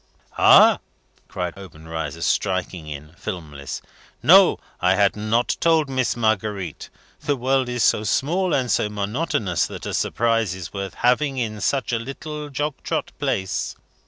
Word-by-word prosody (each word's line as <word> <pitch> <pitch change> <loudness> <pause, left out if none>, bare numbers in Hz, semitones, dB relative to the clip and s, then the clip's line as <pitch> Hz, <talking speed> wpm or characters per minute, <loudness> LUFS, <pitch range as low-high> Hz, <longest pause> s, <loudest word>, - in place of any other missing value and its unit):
"Ah!" - - +7 0.5
cried 90 -1 -4
Obenreizer, 80 -5 -6
striking 95 -4 -1
in, 75 +1 -8
filmless. 80 -8 -6 0.4
"No. - - +7 0.2
I - - +3
had 100 0 +3
not 110 +3 0
told 160 -4 +3
Miss 130 -2 0
Marguerite. 105 -6 -1 0.3
The 145 -1 0
world 130 0 +1
is 125 -2 0
so 105 - +3
small 170 - 0
and 125 -5 +1
so 105 - +1
monotonous 105 - -1
that - - -8
a - - -4
surprise 115 -5 +1
is 90 -6 -8
worth 100 -1 -5
having 135 +3 +1
in 110 -4 -3
such 135 -3 0
a 115 - +1
little 150 +4 -6
jog 145 +2 -2
trot - - -2
place. 95 -3 -2
110 Hz, 145 wpm, -22 LUFS, 95-130 Hz, 0.5 s, Ah